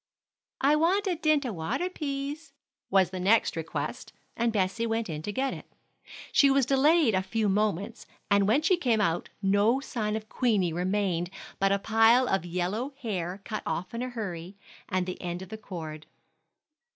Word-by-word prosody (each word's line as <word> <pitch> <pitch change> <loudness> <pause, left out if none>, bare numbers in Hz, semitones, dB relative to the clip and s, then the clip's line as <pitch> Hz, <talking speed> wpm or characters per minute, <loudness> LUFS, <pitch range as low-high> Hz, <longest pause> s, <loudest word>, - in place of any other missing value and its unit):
"I 285 +3 +5
want 360 +7 +2
a 375 - +1
dint 310 -3 +2
a 240 - -2
water, 165 - -2
pease," 285 -2 -5 0.4
was 190 -2 +3
the 185 - -4
next 205 +5 +3
request, 165 0 -4 0.2
and 235 0 +1
Bessie 210 +2 0
went 225 -4 -1
in 150 -1 -4
to 205 - -4
get 265 +5 -1
it. - - -11 0.6
She 280 - +5
was 270 -1 +3
delayed 275 0 +4
a 185 - +2
few 210 +3 -1
moments, 205 +2 -1 0.2
and 200 -1 +3
when 265 +9 +3
she 370 +2 +3
came 240 -9 +1
out 170 -5 0
no 205 +6 +3
sign 215 -6 -3
of 215 0 -5
Queenie 210 -9 +1
remained 180 -1 0 0.3
but 195 0 +3
a 200 - +3
pile 225 +4 +4
of 195 -3 0
yellow 195 +10 -2
hair 190 -4 -3
cut 215 -2 -4
off 170 +5 -3
in 230 - -3
a 255 - -2
hurry, 195 -6 -6 0.3
and 185 -1 0
the 185 - -6
end 175 0 -4
of 190 - -12
the 220 - -6
cord. 160 -7 -8
215 Hz, 180 wpm, -28 LUFS, 185-260 Hz, 0.6 s, I